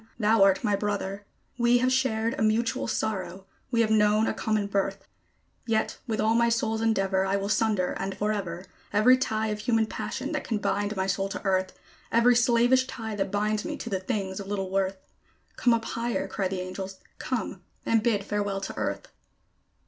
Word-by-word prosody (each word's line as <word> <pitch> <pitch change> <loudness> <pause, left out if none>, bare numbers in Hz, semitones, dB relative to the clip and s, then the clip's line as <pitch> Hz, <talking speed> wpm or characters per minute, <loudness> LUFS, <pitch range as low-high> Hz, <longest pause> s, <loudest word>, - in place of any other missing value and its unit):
thou 220 -1 +3
art 195 +2 +5
my 210 -3 +2
Brother. 200 -1 -3 0.3
We 240 +1 +5
have 255 +1 +2
shared 230 -4 +1
a - - -4
mutual 220 +2 +1
sorrow, 195 -3 -3 0.2
we 235 -2 +2
have 220 -1 +2
known 210 0 +4
a - - 0
common 215 -2 0
birth; 195 -1 -2 0.6
Yet 220 -1 0
with 220 -2 -2
all 220 +1 +3
my 235 0 +3
soul's 225 -1 0
endeavor, 195 -4 +2
I 195 +1 0
will 200 0 -2
sunder, 215 -4 +1
and 195 0 -3
forever, 195 -4 -2 0.3
Every 220 +5 +6
tie 220 -4 -1
of 210 0 -3
human 225 0 +2
passion 265 +5 -4
that 300 -3 -2
can 225 - -1
bind 205 +1 -1
my 190 0 0
soul 195 0 -1
to 195 - -6
Earth 185 -1 0 0.3
Every 235 +2 +5
slavish 245 +2 +4
tie 220 -3 -5
that 200 -2 -1
binds 210 +1 0
me - - -4
to 235 - -6
the 190 - 0
things 190 -2 -3
of 195 - -7
little 195 -2 -3
worth. 195 0 0 0.6
"Come 245 - +2
up 230 -1 +1
higher!" 235 +1 -2
cry 195 - -1
the 185 0 -3
angels: 190 +1 -6 0.2
"come! 225 -7 -3 0.2
and 225 -1 +3
bid 215 -3 +1
farewell 205 -1 -2
to 195 - -6
Earth." - - -3
210 Hz, 190 wpm, -27 LUFS, 195-230 Hz, 0.6 s, Every